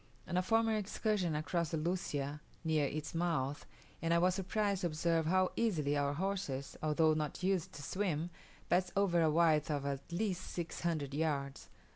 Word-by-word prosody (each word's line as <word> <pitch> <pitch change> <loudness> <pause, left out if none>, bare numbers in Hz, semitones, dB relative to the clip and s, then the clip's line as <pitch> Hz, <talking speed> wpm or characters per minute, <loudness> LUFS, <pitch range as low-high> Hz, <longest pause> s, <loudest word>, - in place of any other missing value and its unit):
On 180 - -3
a 180 - +4
former 225 +3 +2
excursion 205 -4 0
I 150 - -1
crossed 170 -1 -1
the - - +2
Lucia 150 -4 -2 0.2
near 155 -3 +2
its 155 +2 -4
mouth, 160 -5 -1 0.3
and 165 +1 +2
I - - +5
was 180 +2 +4
surprised 195 +1 0
to 175 - +2
observe 165 0 +1
how 185 +2 +3
easily 155 -11 +1
our 145 0 +1
horses, 160 -6 -2
although 155 +1 +3
not 155 +2 -3
used 185 -3 +1
to 145 - -8
swim, 175 -2 -1 0.4
passed 180 +1 +2
over 190 -4 +3
a 160 - +4
width 155 -1 +3
of 145 -2 -1
at 140 +2 -4
least 185 0 -1
six 170 -1 -5
hundred 155 -5 -1
yards. 140 -3 -2
165 Hz, 180 wpm, -35 LUFS, 150-185 Hz, 0.4 s, I